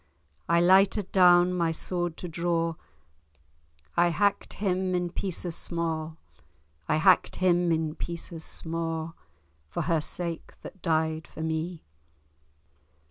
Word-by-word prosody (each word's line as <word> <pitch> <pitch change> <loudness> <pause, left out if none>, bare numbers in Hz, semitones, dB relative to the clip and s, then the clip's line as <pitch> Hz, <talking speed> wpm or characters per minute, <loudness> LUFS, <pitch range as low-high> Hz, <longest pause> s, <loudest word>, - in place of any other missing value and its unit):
I 170 0 +4
lighted 190 +2 +4
down 180 -1 +6
my 170 -2 +1
sword 175 0 -3
to 180 - -5
draw, 170 0 0 1.2
I 175 0 +4
hacked 200 +4 0
him 185 -2 0
in 175 -1 -1
pieces 180 -2 -3
sma', 165 -2 -3 0.7
I 150 - +3
hacked 185 +4 +4
him 175 -2 +2
in 160 -1 0
pieces 170 0 -6
sma', 165 0 -4 0.6
For - - -2
her 165 -2 +1
sake 170 +1 -5
that 195 - -10
died 160 -1 0
for 160 - -7
me. 160 +1 -3
170 Hz, 120 wpm, -27 LUFS, 160-180 Hz, 1.2 s, down